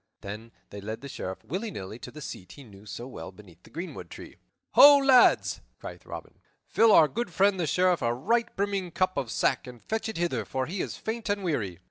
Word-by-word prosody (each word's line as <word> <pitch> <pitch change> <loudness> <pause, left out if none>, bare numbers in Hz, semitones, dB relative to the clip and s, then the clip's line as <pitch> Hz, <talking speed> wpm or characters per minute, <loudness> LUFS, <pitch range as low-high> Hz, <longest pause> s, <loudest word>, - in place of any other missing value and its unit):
Then 105 +3 -8 0.2
he 100 - -8
led 110 +3 -6
the 140 - -7
Sheriff, 95 -8 -6
willy 195 - -4
nilly, 105 - -7
to - - -8
the 150 - -11
seat 90 -8 -8
he 140 - -12
knew 105 -3 -15
so 120 - -7
well 130 - -8
beneath 90 -3 -17
the - - -18
greenwood 175 +3 -7
tree. - - -11 0.3
"Ho, 285 0 +9
lads!" 270 -3 +4 0.2
cried - - -10
Robin, - - -9 0.3
"fill 225 -1 +4
our 160 -6 +7
good 235 +3 -4
friend 190 +3 +2
the 170 - 0
Sheriff 180 +3 +2
a 115 - +1
right 230 - +1
brimming 200 -2 -1
cup 185 +2 0
of 130 - -2
sack - - 0
and 125 -1 -10
fetch 220 - -3
it 220 - -5
hither, 165 -10 -1
for 130 +4 -3
he 180 +6 -4
is - - -5
faint 225 0 -4
and 205 -1 -1
weary." 110 - -2
160 Hz, 220 wpm, -27 LUFS, -, 0.3 s, Ho